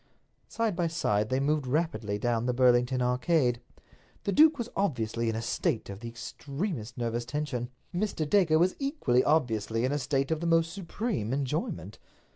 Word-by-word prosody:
Side 225 -4 -1
by 175 -1 +1
side 105 -10 0
they 130 - +1
moved 145 0 0
rapidly 125 -8 -1
down 120 +2 0
the 125 - 0
Burlington 125 0 +3
Arcade. 125 0 +1 0.6
The 200 - 0
duke 310 +5 +6
was 235 -3 -3
obviously 115 - 0
in 110 - -1
a 115 - -3
state 115 -2 -1
of 100 - -8
the 120 - -7
extremest 135 - -5
nervous 120 0 -1
tension. 125 -2 -3 0.2
Mr. 175 -4 -1
Dacre 160 -3 +4
was 180 +3 +3
equally 275 - +1
obviously 115 -6 +1
in 130 - 0
a 145 - 0
state 135 +1 0
of 160 - +1
the 170 - -2
most 165 0 +3
supreme 195 - -3
enjoyment. 130 - -3
135 Hz, 170 wpm, -29 LUFS, 120-165 Hz, 0.6 s, duke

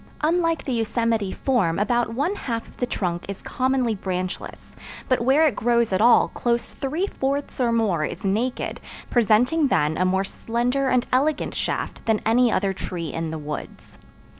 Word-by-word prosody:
Unlike 330 +1 +1
the 265 - -1
Yosemite 225 -3 0
form 195 -12 +1
about 235 +2 +1
one 295 +10 0
half 230 - -4
of - - -17
the 245 - -1
trunk 175 -6 -2
is 200 - -6
commonly 255 -2 0
branchless, 185 -2 -5 0.3
but 255 -2 +2
where 270 +6 +4
it 280 -9 +2
grows 235 -2 +1
at 185 - +2
all 235 +1 +6
close 235 -1 -1
three 305 +8 -2
fourths 280 -7 -3
or 240 -1 +2
more 215 -9 +1
is 155 - -5
naked, 225 +6 -1 0.3
presenting 245 +7 +3
then 150 - +1
a - - +2
more 190 +1 +2
slender 245 +6 -1
and 250 -1 +2
elegant 285 +3 +1
shaft - - -3
than 220 -2 +3
any 235 +2 +4
other 195 0 +1
tree 175 -3 -5
in 165 0 -3
the 160 - -4
woods. 150 -1 -8
235 Hz, 170 wpm, -23 LUFS, 195-260 Hz, 0.3 s, all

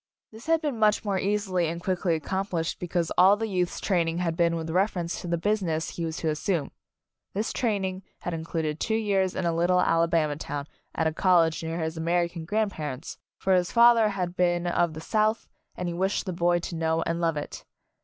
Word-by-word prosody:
This 225 +5 -13
had 325 -1 +3
been 280 -7 -2
much 215 0 +3
more 195 -2 0
easily 195 -3 0
and 170 +1 -3
quickly 180 -1 0
ac 160 - -4
complished 190 -4 -2
because 175 -1 -1
all 190 +3 +7
the 225 - -2
youth's 180 -4 -1
train 175 -4 +1
ing 165 +1 -2
had 170 -2 -1
been 170 -1 +2
with 165 -1 -4
reference 180 -2 0
to - - -7
the 170 0 0
busi 210 +5 0
ness 160 -3 -1
he 170 - -4
was 160 -1 -4
to 160 - -1
assume. 155 0 -1 0.6
This 210 +3 -1
training 195 -5 -1 0.2
had 175 - -3
included 160 -1 -3
two 220 - 0
years 195 -4 +1
in 185 - -2
a 170 - +1
little 175 +2 +3
Alabama 165 -3 +2
town 145 -2 -5 0.3
at 160 - 0
a 160 - +1
college 165 -3 +3
near 165 +1 -3
his 160 0 -3
American 170 0 -1
grandparents, 160 -8 -3 0.2
for 190 - +1
his 180 -1 +2
father 235 -2 +6
had 180 -3 -3
been 175 -1 +1
of 175 -2 +1
the 155 - -7
South 215 +5 0 0.3
and 180 - -4
he 175 - -2
wished 190 +5 -1
the 185 - -3
boy 175 0 +2
to 170 0 -5
know 160 0 0
and 170 +1 -2
love 165 -2 +1
it. 145 - -6
175 Hz, 215 wpm, -27 LUFS, 165-195 Hz, 0.6 s, all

